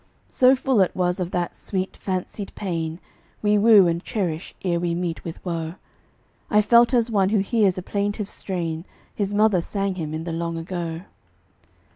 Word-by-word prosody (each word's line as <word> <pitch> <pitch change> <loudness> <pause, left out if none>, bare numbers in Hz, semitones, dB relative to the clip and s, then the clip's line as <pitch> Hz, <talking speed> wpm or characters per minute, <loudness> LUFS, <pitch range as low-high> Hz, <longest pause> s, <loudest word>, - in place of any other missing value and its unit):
So 255 +1 +5
full 260 -4 +2
it 185 - +1
was 180 0 0
of 180 -1 -2
that 175 -1 -2
sweet, 190 -1 -3
fancied 190 +2 -4
pain 165 -4 -3 0.4
We 210 0 +4
woo 210 -3 +7
and 170 +1 0
cherish 180 -7 -3
ere 170 -2 +1
we 170 -1 -1
meet 170 -2 -3
with 165 - -6
woe, 165 -1 -3 0.7
I 210 0 +4
felt 235 +2 +5
as 235 -2 +2
one 195 -3 +3
who 215 - +2
hears 200 -1 +2
a 185 - -4
plaintive 205 +1 -2
strain 170 -5 -4 0.3
His 205 -1 -2
mother 210 -4 +4
sang 195 +2 -2
him 160 -4 -4
in 160 - -4
the 170 - -4
long 165 0 -3
ago. 165 -1 -4
185 Hz, 175 wpm, -23 LUFS, 170-205 Hz, 0.7 s, woo